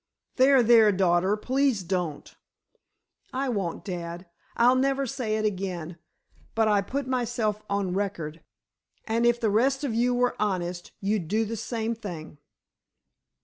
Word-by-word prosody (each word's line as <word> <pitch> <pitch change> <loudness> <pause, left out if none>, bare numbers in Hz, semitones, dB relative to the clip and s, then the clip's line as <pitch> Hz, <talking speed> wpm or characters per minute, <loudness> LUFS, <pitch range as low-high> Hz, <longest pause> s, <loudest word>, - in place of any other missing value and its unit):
"There, 265 -1 +6
there, 225 -2 +6
daughter, 185 +1 +2
please 260 -3 +1
don't." 175 -4 -3 1.0
"I 265 +1 -1
won't, 190 -6 -3
dad. 175 -2 -5 0.3
I'll 245 +2 +6
never 270 +1 +1
say 245 -4 -2
it 215 - -1
again. 180 -4 -3 0.6
But 225 -1 +3
I 205 -2 +3
put 270 +7 -3
myself 240 -4 -1
on 200 -2 -1
record, 170 -5 -3 0.6
and 230 +2 +1
if 240 0 +3
the 225 -4 +1
rest 265 +6 +2
of 270 -5 -1
you 245 +2 +2
were 245 0 +1
honest, 180 -4 -2
you'd 200 -4 -1
do 220 +5 +1
the 225 +2 -4
same 225 0 -2
thing!" 170 -9 -8
215 Hz, 145 wpm, -26 LUFS, 185-245 Hz, 1.0 s, There